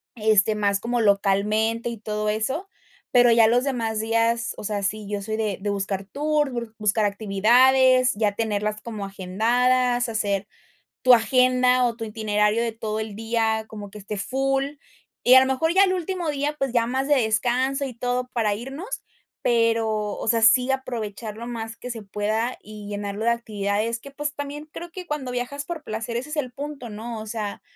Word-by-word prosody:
este, 215 -1 +3
más 200 -1 +1
como 240 0 -1
localmente 210 +3 +2
y 235 - -5
todo 210 0 -2
eso. 245 - -2 0.4
Pero, 245 -1 +6
ya 230 -1 +6
los 245 +2 +3
demás 230 -5 -1
días, 230 +1 +1
o - - -8
sea, 205 -1 -2
sí, 210 +1 -2
yo 205 -1 -2
soy 215 +2 -3
de 215 -3 -1
de 205 - -2
buscar 195 -1 -2
tour, 295 +5 0
bur 235 -2 -5
buscar 210 0 +1
actividades, 250 +6 +4
ya 210 -1 +1
tenerlas 210 -1 -2
como 215 -4 -5
agendadas, 245 +6 +1
hacer 205 -3 -1 0.5
tu 255 - +7
agenda 250 +1 +4
o 235 - 0
tu 230 - -6
itinerario 210 0 +1
de 235 - -1
todo 220 -1 -4
el 215 -2 -5
día 225 0 0
como 210 -2 -8
que 210 - -10
esté 205 +1 -6
full. 270 +5 0 0.5
Y 250 - +6
a - - +11
lo 265 - +2
mejor 320 +6 +1
ya 385 - +6
el 375 -2 +2
último 360 -2 -2
día, 290 +1 -1
pues, 270 -3 -1
ya 230 -1 +3
más 265 +2 -1
de 290 - +4
descanso 250 +5 +1
y 260 - -6
todo 245 +1 -1
para 220 -4 +1
irnos, 275 - -6 0.4
pero, 225 -3 +1
o - - -5
sea, 230 0 +3
sí 250 +4 +5
aprovechar 225 -5 -4
lo 235 - -6
más 230 -1 -5
que 250 - -8
se 230 -2 -6
pueda, 215 +4 -2
y 210 -1 -10
llenarlo 205 +1 -4
de 235 - +4
actividades 215 0 -1
que, 280 - -11
pues, 295 +1 -4
también 290 +1 -6
creo 345 +2 -8
que 365 +1 -8
cuando 290 -5 -3
viajas 250 +4 -4
por 330 -2 -6
placer, 225 0 -4
ese 260 +5 -5
es 300 - -4
el 255 -5 -2
punto, 280 -2 -7
¿no? 220 +2 -6
O - - -7
sea, 210 -2 -4
230 Hz, 190 wpm, -24 LUFS, 210-255 Hz, 0.5 s, a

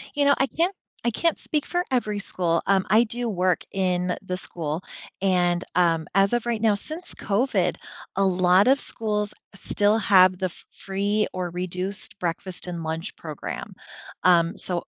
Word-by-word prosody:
You 285 0 +2
know, 280 - +5
I 270 - +2
can't 345 +7 0 0.3
I 240 - +2
can't 330 +8 0
speak 300 -2 -2
for 355 0 0
every 215 -5 0
school, 170 -4 0
um, 195 -1 +3
I 220 +2 +6
do 240 +2 -3
work 185 -4 +1
in 180 -2 0
the 185 -2 -4
school, 165 -1 -4 0.4
and, 180 -2 +2
um, 165 -3 +2
as 195 +2 +4
of 240 -1 +1
right 235 -2 -1
now, 220 -2 +4
since 315 - -5
COVID, 200 -4 +1 0.4
a 195 - +3
lot 185 +1 +4
of 270 +2 +5
schools 210 -2 -2 0.2
still 205 +2 +2
have 185 -4 +5
the 190 - -1
f 180 - -6
free 200 +2 -1
or 180 -1 -2
reduced 180 +3 -4
breakfast 180 +1 -4
and 170 -2 -4
lunch 160 +2 -3
program, 155 -3 -6 0.5
um, 170 0 +4
so 175 -2 -3
190 Hz, 170 wpm, -25 LUFS, 180-215 Hz, 0.5 s, I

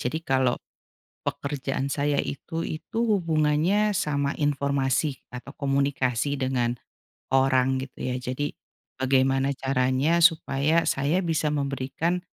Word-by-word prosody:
Jadi 125 +6 -1
kalau 130 -2 +2 0.7
pekerjaan 140 -1 -2
saya 145 0 +1
itu 165 +4 -4
itu 160 +8 -5
hubungannya 175 +1 +2
sama 140 -2 0
informasi 140 -1 0
atau 125 +3 -8
komunikasi 140 -1 0
dengan 125 -2 0 0.6
orang 130 0 +3
gitu 135 -1 -9
ya. 125 - -1
Jadi 130 +3 -3 0.4
bagaimana 135 +1 +2
caranya 130 +4 +1
supaya 160 -1 +3
saya 145 +7 +1
bisa 160 -2 +1
memberikan 140 +5 -1
140 Hz, 105 wpm, -26 LUFS, 130-155 Hz, 0.7 s, orang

